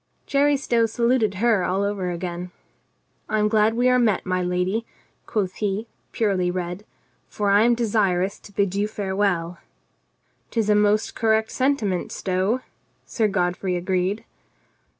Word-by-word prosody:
Jerry 285 0 +3
Stow 235 -4 +1
saluted 235 -2 +1
her 215 -1 +2
all 190 +3 0
over 200 -3 -2
again. 175 0 -4 0.8
"I 215 - +1
am 210 0 +3
glad 215 +1 +3
we 245 +2 +2
are 250 0 +4
met, 220 -5 +1
my 185 0 0
lady," 180 +5 0 0.4
quoth 190 -4 -2
he, 210 +1 -1 0.3
purely 195 -5 +1
red, 180 +2 -4 0.4
"for 205 -1 0
I 200 +1 +5
am 240 0 +4
desirous 200 -5 0
to - - -15
bid 200 -2 0
you 200 +1 0
farewell." 190 -4 -1 0.5
" - - -45
'Tis 220 -3 0
a - - +5
most 210 +1 +2
correct 220 -1 +1
sentiment, 255 -9 0
Stow," 190 +6 -1 0.4
Sir 220 -3 0
God 180 -3 0
frey 185 -1 -2
agreed. 185 +3 -1
205 Hz, 150 wpm, -23 LUFS, 185-225 Hz, 0.8 s, I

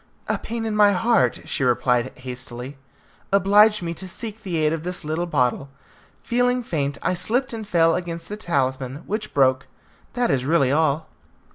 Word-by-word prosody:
"A - - 0
pain 230 0 -4
in 220 -1 -2
my 205 -1 +5
heart," 230 +4 +2
she 140 - -2
replied 125 0 +2
hastily, 125 +1 -7 0.6
"obliged 205 +1 +5
me 170 0 -3
to 185 +3 -8
seek 220 +3 -6
the 180 -5 -3
aid 155 0 +2
of 165 - -3
this 180 -1 -5
little 160 +3 -2
bottle. 130 -2 0 0.5
Feeling 245 +1 +1
faint, 145 -8 -2
I - - +1
slipped 235 +8 -1
and 220 -2 -6
fell 165 -4 +3
against 170 -2 -4
the 210 - -5
talisman, 135 -6 -2
which 215 +1 -3
broke. 130 -2 +2 0.5
That 245 -2 +1
is 130 -2 +1
really 140 -2 +2
all." 155 +1 +1
170 Hz, 170 wpm, -23 LUFS, 140-210 Hz, 0.6 s, my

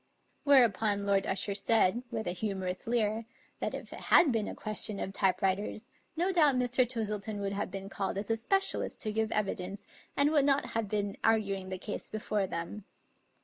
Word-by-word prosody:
Whereupon 220 -7 +4
Lord 195 -1 +2
Usher 200 +1 -1
said,, 220 +1 +3
with 220 -2 -3
a - - -1
humorous 185 -1 -4
leer, 225 -1 0 0.3
that - - -2
if - - -8
it - - -8
had 305 - +7
been 225 -3 0
a - - -5
question 215 -1 +1
of 195 - -4
type 190 -2 +1
writers, 200 +3 -1 0.3
no 360 +3 +1
doubt 300 -6 +5
Mr. 250 0 +2
Twistleton 215 -3 -3
would 200 0 -2
have 200 +1 -2
been 195 +1 -6
called 195 -1 -3
as 200 +2 -3
a - - +3
specialist 390 - 0
to 215 - 0
give 220 0 0
evidence, 195 -1 -2 0.3
and 285 +1 +4
would 295 -3 +4
not 280 0 +2
have 225 -2 -1
been 205 -1 -2
arguing 200 -4 +1
the 185 - -4
case 205 +3 -5
before 210 -2 -1
them. 170 +5 -5
210 Hz, 190 wpm, -31 LUFS, 195-230 Hz, 0.3 s, had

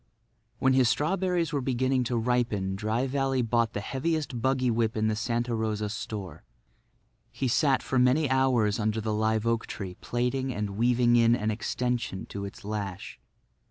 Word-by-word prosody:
When 130 0 +3
his 130 -2 +4
strawberries 170 +4 0
were 140 - 0
beginning 130 0 +1
to 120 0 -1
ripen 115 -5 0
Dry 110 +5 -1
Valley 135 -1 0
bought 115 -1 +1
the 100 - -3
heaviest 140 +1 -2
buggy 130 -1 +2
whip 115 -1 0
in 110 0 +1
the 110 - 0
Santa 120 +2 -1
Rosa 110 -2 -1
store. 100 -3 -6 0.9
He 135 - -2
sat 135 +2 +2
for 130 - 0
many 130 +5 +3
hours 130 -5 +2
under 110 0 0
the 110 0 -2
live 110 +1 +1
oak 115 0 0
tree 95 -4 -6
plaiting 125 +2 -1
and 105 -3 -3
weaving 120 +3 +3
in 115 0 +5
an 110 -2 -1
extension 115 -2 -2
to 100 0 -4
its 100 - -10
lash. 100 -3 -5
120 Hz, 165 wpm, -28 LUFS, 110-130 Hz, 0.9 s, in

